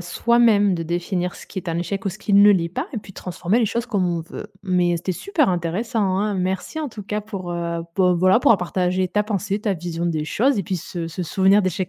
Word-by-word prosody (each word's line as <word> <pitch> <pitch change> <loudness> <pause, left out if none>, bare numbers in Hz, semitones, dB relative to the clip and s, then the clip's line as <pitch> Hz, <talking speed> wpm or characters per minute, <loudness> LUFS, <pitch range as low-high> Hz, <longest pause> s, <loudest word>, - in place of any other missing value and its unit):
soi-même 205 +2 +3
de 165 - -3
définir 175 +2 -2
ce - - -12
qui 190 - -5
est 185 - -8
un 165 0 -1
échec 180 +3 -3
ou - - +1
ce 195 +2 -7
qui 210 - -3
ne 200 +1 +8
l'est 175 -4 +2
pas. 260 - -4
Et 230 - -2
puis 195 -1 -12
de - - -31
transformer 180 +5 -1
les - - +3
choses 235 +3 -2
comme 200 -6 0
on 170 -1 -1
veut. 210 - -8 0.2
Mais 180 -2 +2
c'était 180 +2 -3
super 300 - +1
intéressant, 185 +3 -1
hein. 210 +1 0
Merci 185 - -2
en 305 - -3
tout 215 -4 -9
cas 210 +1 -2
pour, 195 -5 -6
heu, 170 -1 -3
bah, 185 -2 +4
voilà, 185 +5 +4
pour - - +4
avoir 220 - +6
partager 185 +1 0
ta 210 +3 0
pensée, 205 -1 -2
ta 210 -1 0
vision 170 0 -4
des 160 -3 -1
choses 255 - +1
et 195 - -1
puis 185 - -2
se 170 0 -5
se 165 +2 -5
souvenir 195 +4 +3
d'échecs 185 0 -1
190 Hz, 260 wpm, -22 LUFS, 175-210 Hz, 0.2 s, ne